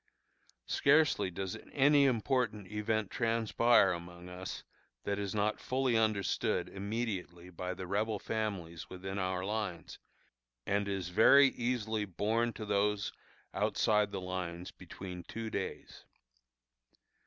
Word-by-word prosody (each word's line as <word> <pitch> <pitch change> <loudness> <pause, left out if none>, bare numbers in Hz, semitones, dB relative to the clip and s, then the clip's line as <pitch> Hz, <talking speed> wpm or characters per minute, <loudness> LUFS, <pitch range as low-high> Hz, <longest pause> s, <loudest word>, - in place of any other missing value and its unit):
Scarcely 150 -8 +3
does 95 +1 -4 0.2
any 145 +1 +5
important 115 -4 +1
event 105 -1 -1
transpire 115 0 +3
among 85 0 -7
us, 90 +1 -6 0.4
that 100 0 -1
is 100 0 -3
not 105 +1 +1
fully 130 -2 0
understood 110 -3 +1
immediately 100 -4 -4
by 90 +1 -4
the 95 +1 -6
Rebel 105 +3 0
families 100 -7 -4
within 95 +1 -5
our 95 0 -1
lines, 100 -5 -4 0.7
and 100 0 0
is 95 -3 -2
very 135 +9 +7
easily 110 -4 -1
borne 110 +5 0
to 110 - -6
those 105 0 +1 0.4
outside 105 -1 +2
the 100 - -3
lines 90 0 -4
between 90 -1 -8
two 110 +5 -6
days. 95 - -5
105 Hz, 120 wpm, -33 LUFS, 95-115 Hz, 0.7 s, very